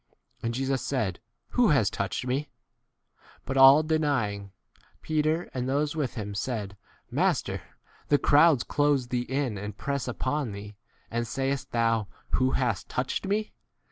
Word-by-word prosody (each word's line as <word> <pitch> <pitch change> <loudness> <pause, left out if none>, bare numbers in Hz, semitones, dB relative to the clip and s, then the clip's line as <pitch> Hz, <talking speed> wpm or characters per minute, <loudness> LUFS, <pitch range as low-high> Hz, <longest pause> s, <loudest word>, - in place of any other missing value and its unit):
And 115 0 -2
Jesus 135 0 0
said, 110 -11 -1 0.3
Who - - +3
has - - +3
touched - - -3
me? 135 +3 -1 1.0
But 135 - -3
all 135 +3 +8
denying, 135 -11 0 0.5
Peter 155 +2 0
and 125 0 -2
those 145 +3 0
with 145 -6 -2
him 105 -3 -4
said, 105 -2 -3 0.4
Master, - - 0 0.5
the 145 - +4
crowds 145 -2 +5
close 145 -4 +1
thee 125 -1 -1
in 130 -6 -1
and 105 0 -6
press 140 -2 -2
upon 130 -1 -2
thee, 100 +1 -8 0.4
and 120 +1 -1
sayest 135 +2 -2
thou, 115 -3 +1 0.2
Who 130 0 +2
has 125 -7 0
touch 125 +1 -2
48 - - -8
ed - - -4 0.2
me - - -30
130 Hz, 150 wpm, -27 LUFS, 115-145 Hz, 1.0 s, all